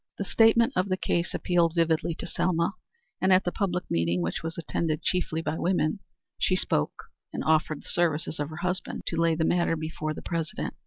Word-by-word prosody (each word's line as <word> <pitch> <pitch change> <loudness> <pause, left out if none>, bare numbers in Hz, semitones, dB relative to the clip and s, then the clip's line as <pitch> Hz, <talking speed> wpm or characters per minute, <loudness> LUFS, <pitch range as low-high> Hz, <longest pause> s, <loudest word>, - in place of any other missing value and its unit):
The - - -2
statement 225 +3 +4
of 185 +2 +1
the 185 - +1
case 175 -1 -1
appealed 170 -2 +2
vividly 165 -1 +1
to - - -6
Selma, 170 +1 0 0.5
and 190 - +3
at 185 +1 +6
the 175 - -1
public 180 -3 -1
meeting, 85 +1 +1
which 85 - -2
was 165 0 -5
attended 160 -1 -2
chiefly 165 -3 0
by 160 - -2
women, 175 0 +1 0.4
she 185 - +2
spoke, 75 - -1 0.3
and - - -4
offered 155 -1 +1
the - - -16
services 160 -2 0
of 145 0 -2
her 155 - -8
husband 180 +1 -2
to 165 - -1
lay 165 -1 +3
the 160 0 +1
matter 170 -1 +2
before 155 -1 -4
the - - -8
President. 170 +5 -3
170 Hz, 200 wpm, -27 LUFS, 155-180 Hz, 0.5 s, at